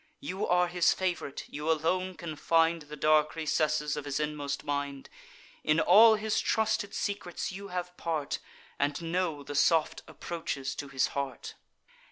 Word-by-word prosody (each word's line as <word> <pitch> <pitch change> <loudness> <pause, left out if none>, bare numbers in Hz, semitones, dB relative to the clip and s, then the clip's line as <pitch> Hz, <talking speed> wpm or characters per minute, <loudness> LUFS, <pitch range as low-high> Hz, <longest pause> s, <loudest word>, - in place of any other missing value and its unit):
You 200 -8 -3
are 180 0 +3
his 175 -1 +3
fav'rite; 180 -7 -2
you 150 +2 -4
alone 180 +4 +1
can 160 -2 -6
find 165 +2 +2
The 150 0 -9
dark 155 0 +3
recesses 155 -1 0
of 145 - -5
his 140 0 -2
inmost 145 -2 -3
mind: 140 -1 -3 0.5
In 155 +1 +3
all 220 +4 +7
his 215 0 0
trusted 215 -2 0
secrets 200 -4 -3
you 200 +2 -7
have 180 -1 -5
part, 155 -4 -2 0.4
And 145 +3 0
know 165 -3 -2
the 145 - -7
soft 160 +2 +2
approaches 160 -5 -4
to 145 - -5
his 135 -1 0
heart. 140 -2 -4
160 Hz, 155 wpm, -30 LUFS, 145-180 Hz, 0.5 s, all